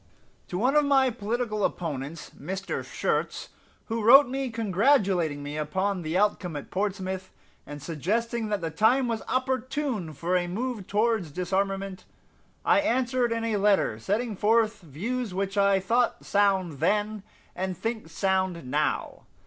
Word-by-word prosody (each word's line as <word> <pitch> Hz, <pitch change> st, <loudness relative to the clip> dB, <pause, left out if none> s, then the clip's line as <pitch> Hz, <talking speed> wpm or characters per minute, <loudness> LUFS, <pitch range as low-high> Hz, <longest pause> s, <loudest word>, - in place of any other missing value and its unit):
To 180 Hz, -, -4 dB
one 255 Hz, +8 st, +2 dB
of 300 Hz, -, +6 dB
my 270 Hz, -2 st, +4 dB
political 215 Hz, -1 st, -2 dB
opponents, 155 Hz, -3 st, -3 dB
Mr. 190 Hz, +1 st, -4 dB
Schurz, -, -, -2 dB, 0.4 s
who 225 Hz, 0 st, -2 dB
wrote 265 Hz, +6 st, +8 dB
me 265 Hz, +1 st, -2 dB
congratulating 195 Hz, -, +2 dB
me 145 Hz, +1 st, -5 dB
upon 185 Hz, +5 st, -1 dB
the 160 Hz, +2 st, -1 dB
outcome 190 Hz, -4 st, +1 dB
at 145 Hz, -, -7 dB
Portsmouth, 190 Hz, -1 st, -2 dB, 0.4 s
and 145 Hz, -1 st, -8 dB
suggesting 220 Hz, -, -1 dB
that 205 Hz, -3 st, -1 dB
the 165 Hz, -1 st, -3 dB
time 240 Hz, -, +3 dB
was 230 Hz, -2 st, -2 dB
opportune 255 Hz, -, -1 dB
for 170 Hz, +6 st, -1 dB
a 175 Hz, -1 st, +1 dB
move 220 Hz, +2 st, -3 dB
towards 215 Hz, -4 st, +1 dB
disarmament, 195 Hz, +3 st, -2 dB, 0.6 s
I -, -, +5 dB
answered 255 Hz, -3 st, +1 dB
in 230 Hz, 0 st, -1 dB
a 225 Hz, -2 st, 0 dB
letter 195 Hz, -, +2 dB
setting 215 Hz, -, -1 dB
forth 215 Hz, +1 st, +2 dB
views 200 Hz, -, -4 dB
which 195 Hz, +1 st, -2 dB
I 200 Hz, -1 st, +4 dB
thought 235 Hz, +4 st, +1 dB
sound 190 Hz, -7 st, +1 dB
then, 210 Hz, +4 st, +1 dB, 0.3 s
and 185 Hz, -1 st, -3 dB
think 225 Hz, +2 st, -4 dB
sound 190 Hz, -5 st, 0 dB
now. 145 Hz, +4 st, -2 dB
200 Hz, 145 wpm, -27 LUFS, 180-230 Hz, 0.6 s, wrote